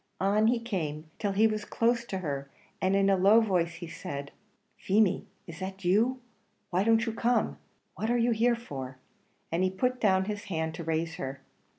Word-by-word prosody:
On 205 +3 +3
he 240 +1 +3
came 160 -9 -4
till 205 -2 0
he 210 +3 +4
was 215 -1 +1
close 235 +2 +1
to 195 - -4
her, 140 -1 -3 0.3
and 190 +1 +2
in 195 0 +3
a 195 - +5
low 200 +4 +6
voice 180 -6 +1
he 170 0 -7
said, 140 -3 -6 0.4
"Feemy, 200 -1 +2 0.2
is 165 +1 -10
that 190 0 -6
you? 225 +8 +3 0.5
why 185 +2 +2
don't 225 +1 +3
you 225 - -2
come? 240 +2 +1 0.3
what 220 - -3
are 240 - +3
you 240 0 +2
here 235 +2 +3
for?" 135 - -7 0.5
and 170 +3 +1
he 185 - +3
put 250 +7 -1
down 190 -3 +3
his 205 0 -4
hand 160 -4 -2
to 165 - -6
raise 165 0 -2
her. 135 0 -5
195 Hz, 195 wpm, -29 LUFS, 165-225 Hz, 0.5 s, low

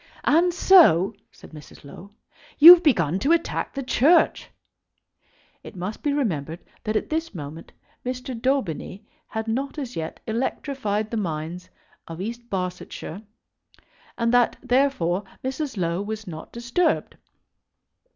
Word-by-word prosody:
"And 340 +4 +3
so," 320 - +5 0.2
said - - -16
Mrs. 150 -2 -13
Low, 170 +7 -12 0.5
"you've 340 +3 +11
begun 185 - +2
to 280 +10 +1
attack 335 -2 -2
the 275 - -3
Church?" 285 +6 +3 1.1
It - - -12
must 185 +4 -6
be 290 - 0
remembered 170 - -2 0.2
that 215 0 -2
at 215 - -2
this 320 -7 -2
moment 155 +1 -8 0.3
Mr. 255 +1 -5
Daubeny 230 - -2 0.2
had 220 0 -5
not 270 +6 -3
as 260 -5 -5
yet 160 -1 -5
electrified 220 -2 -2
the 230 - -2
minds 170 -2 -4 0.4
of 165 0 -8
East 235 +4 -6
Barsetshire, 180 -1 -5 1.0
and 230 0 0
that, 245 -1 +3
therefore, 245 -9 +1 0.2
Mrs. 265 -1 -4
Low 170 0 -1
was 215 +1 -5
not 160 -4 -9
disturbed. 240 +9 -1
225 Hz, 130 wpm, -24 LUFS, 180-275 Hz, 1.1 s, you've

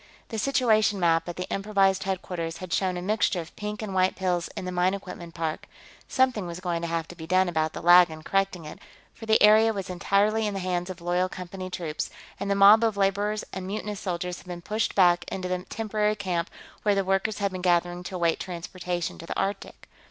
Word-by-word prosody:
The 225 - -3
situation 220 -6 +2
map 165 -1 +2
at 175 - -5
the 180 - -4
improvised 195 -1 +1
headquarters 175 -3 -3
had 185 -1 -6
shown 185 -2 0
a 175 - -5
mixture 205 -2 +1
of 170 0 -8
pink 210 0 -5
and 200 -3 -5
white 185 0 +2
pills 180 -2 -1
in - - -4
the 180 - -3
mine 180 +2 +2
equipment 175 -3 -9
park; 160 -2 -3 0.4
something 255 -8 +1
was 170 +1 -6
going 175 -2 -2
to 170 - -2
have 165 -1 -2
to 175 - -9
be 160 -1 -9
done 185 +1 +3
about 160 -2 0
the - - -7
lag 175 0 +8
in 155 0 -9
correcting 195 -3 0
it, 150 - -9 0.3
for 225 -1 -11
the 220 - +5
area 215 +1 +7
was 195 -3 -5
entirely 205 +4 +1
in 205 - -3
the - - -2
hands 180 -1 -2
of 185 -2 -7
loyal 180 +2 0
Company 185 0 -7
troops, 165 -4 -4 0.3
and 200 - -3
the 200 - +2
mob 205 +3 +7
of 220 -3 +1
laborers 205 +2 +1
and 190 -1 -5
mutinous 210 0 -4
soldiers 180 -1 -3
had - - -17
been 175 -1 -7
pushed 215 +3 -1
back 175 -2 +5
into 185 -1 -3
the 180 0 -3
temporary 215 -1 -1
camp 185 -4 -2 0.3
where 205 -1 +2
the 195 -1 0
workers 195 +3 0
had 200 -1 -1
been 185 -1 -5
gathered 175 0 +1
to 185 - -6
await 170 -2 +1
transportation 175 -1 -4
to 165 - -9
the - - -4
Arctic. 200 +1 -4
185 Hz, 225 wpm, -26 LUFS, 175-205 Hz, 0.4 s, lag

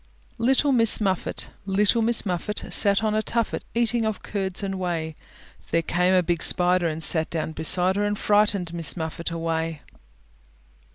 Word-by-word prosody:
LITTLE 265 +4 +3
MISS 230 -4 +5
MUFFET 190 -4 -2 0.2
Little 205 +4 +2
Miss 230 0 +1
Muffet 185 +2 -3
Sat 200 0 +3
on 215 -1 +1
a 215 - +1
tuffet 230 0 -2
Eating 235 0 +1
of 220 -3 -3
curds 195 -1 -3
and 195 -1 -3
whey; 165 -3 -3 0.5
There 165 - +1
came 180 +3 +1
a 180 - +3
big 170 -1 -1
Spider 180 -1 +2
And 160 0 -3
sat 160 0 0
down 160 -1 -3
beside 180 +4 0
her, 205 - +1
And 205 0 -1
frightened 205 -5 +1
Miss 170 0 -1
Muffet 160 +1 -4
away. 165 -2 -3
185 Hz, 165 wpm, -24 LUFS, 165-210 Hz, 0.5 s, MISS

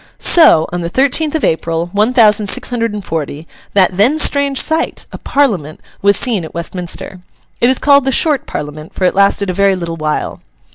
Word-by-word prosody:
So, 315 - +5
on 175 - -3
the 170 - -4
thirteenth 280 - 0
of 315 - -2
April, 165 +1 -1
one 210 +4 +2
thousand 215 -4 +3
six 250 +5 -1
hundred 230 -2 -1
and 205 -3 -7
forty, 155 0 -5 0.3
that 185 -2 +2
then 245 +10 +3
strange 280 -2 +2
sight, 320 +1 -1
a - - -9
Parliament, 195 - -1 0.2
was 200 0 +3
seen 220 -8 -1
at 160 - -10
Westminster. 175 +2 -5 0.4
It 240 - +3
is 260 - +2
called 280 -2 +3
the 270 - +1
Short 295 +2 +1
Parliament, 150 +1 -7
for - - -4
it 180 - +2
lasted 200 0 +1
a - - -5
very 195 +1 +2
little 170 -2 -5
while. 155 -1 -3
200 Hz, 195 wpm, -14 LUFS, 170-260 Hz, 0.4 s, So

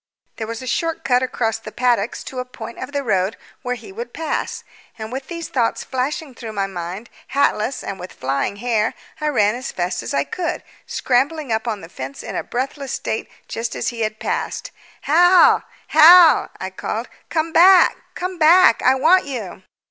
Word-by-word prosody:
There 220 - -4
was 230 +2 -6
a - - -7
short 330 +6 -2
cut 250 -1 +3
across 225 -3 -1
the 220 -1 -9
paddocks 240 -3 0
to 260 - -6
a - - -1
point 235 -2 -10
of 260 - -6
the 285 -1 -2
road 195 -3 0 0.2
where 250 -1 -2
he 235 - -11
would 470 +5 -7
pass; 320 -1 -3 0.3
and 220 0 -7
with 265 +1 -5
these 335 -1 -6
thoughts 235 -4 0
flashing 270 +2 -3
through 230 -2 -8
my 200 -1 -1
mind, 190 +3 -6 0.3
hatless 275 -2 +1
and 195 -1 -6
with 180 +1 -8
flying 135 +8 -2
hair, 225 0 0 0.3
I 300 - 0
ran 210 -8 +2
as 255 +2 -5
fast 180 0 -2
as 115 - -6
I 140 - +1
could, 345 - -4 0.2
scrambling 275 +2 0
up 220 +2 -1
on 215 -4 -2
the 165 - -10
fence 135 -5 -8
in - - -6
a - - -1
breathless 270 +2 -4
state - - -3 0.2
just 230 +1 -4
as - - -1
he 235 - -8
had 215 0 -1
passed. - - -3 0.3
"Hal, 355 +4 +5 0.2
Hal!" 330 +2 +8
I - - -5
called. - - -4 0.2
"Come 320 0 -1
back, 365 +2 +7 0.2
come 365 0 -4
back! 325 -5 +6
I 260 +1 +4
want 330 +8 +4
you." 230 -10 -6
250 Hz, 190 wpm, -20 LUFS, 215-310 Hz, 0.3 s, Hal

